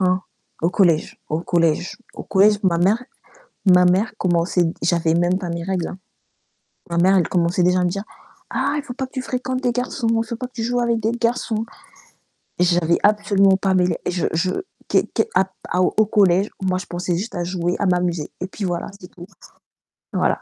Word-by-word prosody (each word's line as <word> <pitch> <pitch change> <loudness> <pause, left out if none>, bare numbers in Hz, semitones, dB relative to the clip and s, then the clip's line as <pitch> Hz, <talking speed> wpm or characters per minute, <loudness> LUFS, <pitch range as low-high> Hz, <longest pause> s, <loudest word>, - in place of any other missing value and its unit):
Hein, 185 0 +2 0.4
au 165 - +2
collège 175 -4 +2
au 155 +2 -1
collège 170 0 0 0.2
au - - -8
collège, 205 +2 +4
ma 170 -3 +3
mère 200 +7 +3 0.6
ma 180 -2 +6
mère 185 +5 +2
commençait 175 -2 +1
j'avais 165 -2 +2
même 175 +2 +2
pas 185 -3 -5
mes 170 0 -4
règles, 185 -2 -2
hein. - - -8 0.9
Ma 170 - -2
mère, 185 +3 +4
elle 175 - +1
commençait 175 +1 +1
déjà 180 +1 +3
à - - +1
me 175 - +1
dire: 195 +2 -3 0.5
«Ah, - - 0
il - - -3
faut 265 -3 -8
pas 265 +1 -3
que 260 - -26
tu 260 - -3
fréquentes 255 0 -3
des 245 -1 +1
garçons, 250 0 -2 0.2
il - - -9
faut 235 0 -5
pas 250 - -5
que 250 - -19
tu 230 - -4
joues 245 +2 0
avec 235 -1 +1
des 220 +1 0
garçons», 230 -2 -1 0.9
et 180 - +4
j'avais 170 -1 +2
absolument 200 -2 +4
pas 190 0 0
mêlé 180 -1 +2
et - - 0
je 180 -1 0
je 175 +3 +1 0.4
qué - - +2
qué - - +2
à 190 - +4 0.4
au 215 +4 +3
collège, 195 -2 +3
moi, 185 -1 +1
je 185 - -6
pensais 175 0 -2
juste 210 +7 -5
à 175 - -2
jouer, 175 0 -1
à 205 - 0
m'amuser, 175 -3 0
et - - -1
puis 195 +2 -6
voilà, 175 -1 -3
c'est 180 - -11
tout. 175 0 -12 0.9
Voilà. - - +1
185 Hz, 210 wpm, -21 LUFS, 175-215 Hz, 0.9 s, ma